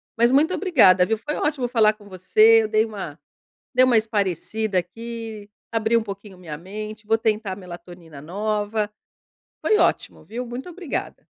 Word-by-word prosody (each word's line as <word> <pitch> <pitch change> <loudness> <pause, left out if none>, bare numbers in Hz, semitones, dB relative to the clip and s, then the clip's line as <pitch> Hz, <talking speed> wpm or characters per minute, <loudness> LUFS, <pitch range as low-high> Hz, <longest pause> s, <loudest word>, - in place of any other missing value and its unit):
Mas 235 +2 +3
muito 310 +6 +3
obrigada, 240 - +5
viu? 225 +3 0
Foi 295 +8 -5
ótimo 290 -4 -1
falar 220 -3 +4
com 210 -1 -18
você 215 +4 +5
eu - - -1
dei 215 +1 +2
uma 190 -9 -7 0.5
dei 255 0 +5
uma 250 -3 +4
espairecida 215 -1 0
aqui, 225 +2 -6 0.2
abri 225 0 +1
pouquinho 200 -2 -9
minha 160 -5 -8
mente, 215 +4 -8
vou 225 - +3
tentar 215 -3 0
a 185 - -5
melatonina 175 -4 -11
nova. 210 +5 -2 0.7
Foi 430 - +4
ótimo, - - 0
viu? 240 +3 -5
Muito 245 +7 -7
obrigada. 350 -3 -5
215 Hz, 160 wpm, -23 LUFS, 195-230 Hz, 0.7 s, obrigada